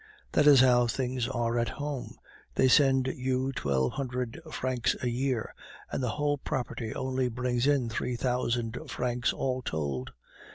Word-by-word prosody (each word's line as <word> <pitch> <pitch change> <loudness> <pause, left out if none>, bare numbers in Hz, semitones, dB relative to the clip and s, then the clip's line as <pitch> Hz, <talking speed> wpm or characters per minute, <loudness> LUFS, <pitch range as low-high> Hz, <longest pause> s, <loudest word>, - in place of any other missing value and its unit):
"That 150 - +4
is 140 -3 +9
how 120 -2 +5
things 125 0 -1
are 120 -2 0
at 115 - 0
home. 145 -3 -5 0.4
They 130 - +4
send 135 0 +5
you 130 +1 -1
twelve 70 - 0
hundred 125 -1 -3
francs 130 -3 0
a 125 - +1
year, 125 -2 -1 0.4
and - - -2
the 125 - 0
whole 145 -1 +1
property 120 -4 -3
only 130 -1 -1
brings 125 +1 0
in 140 -4 +3
three 120 +2 -2
thousand 120 -1 -1
francs 125 0 0
all 130 -1 -2
told. 70 - -3
125 Hz, 155 wpm, -29 LUFS, 120-130 Hz, 0.4 s, is